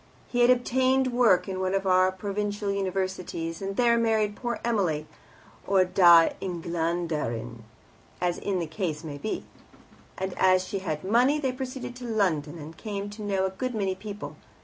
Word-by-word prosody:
He 245 - -1
had 240 0 +6
obtained 255 +1 +2
work 235 -7 +4
in 190 -1 -3
one 185 +1 0
of 195 0 -1
our 185 0 +4
provincial 205 +1 -3
Universities, 185 -3 -3
and 195 0 -3
there 235 0 +3
married 220 -2 +1
Poor 240 0 -3
Emily 180 -10 0 0.6
(or 190 -2 +4
Die 175 -2 +6
Englanderin 165 -9 -2 0.6
as 175 -1 0
the 185 -4 -1
case 155 -1 -3
may 145 -3 -7
be), 215 - -4 0.7
and 190 -1 -3
as 185 0 +4
she 200 0 -3
had 155 -5 -4
money, 245 +9 +3
they 270 -4 0
proceeded 255 -1 -6
to 250 - -8
London, 170 -9 0
and 160 +1 -9
came 205 -2 -5
to 210 +1 -9
know 195 -2 0
a 190 - -1
good 255 +5 -4
many 195 -3 0
people. 205 +2 -8
195 Hz, 165 wpm, -27 LUFS, 175-225 Hz, 0.7 s, had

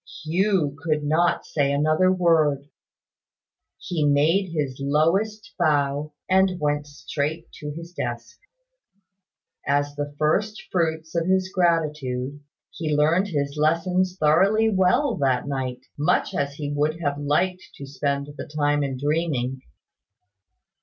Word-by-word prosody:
Hugh 175 -3 +1
could 150 -1 0
not 160 +4 +1
say 140 -2 0
another 155 +6 +3
word. 160 -6 +2 1.1
He 165 -4 -2
made 155 +7 +3
his 140 -5 -3
lowest 190 +10 +1
bow, 145 -2 +1
and 190 -1 +3
went 150 -1 -1
straight 150 +2 -4
to 150 - -5
his 165 +3 -8
desk. 120 -6 -5 1.3
As 145 0 +1
the 145 0 -5
first 200 +8 +1
fruits 160 -2 -1
of 170 0 0
his 185 0 +1
gratitude, 150 -7 0 0.3
he 155 -3 -2
learned 165 +6 +3
his 140 -5 -2
lessons 180 +4 +1
thoroughly 195 +9 +4
well 195 +7 +2
that 130 -2 +1
night; 130 -3 -3 0.2
much 150 - +1
as 140 0 -2
he 145 -1 -4
would 150 +3 0
have 145 -3 -1
liked 180 +6 0
to 140 - -8
spend 140 0 -2
the - - -7
time 145 -1 +1
in 135 -2 -2
dreaming. 140 -3 -1
150 Hz, 125 wpm, -24 LUFS, 145-175 Hz, 1.3 s, thoroughly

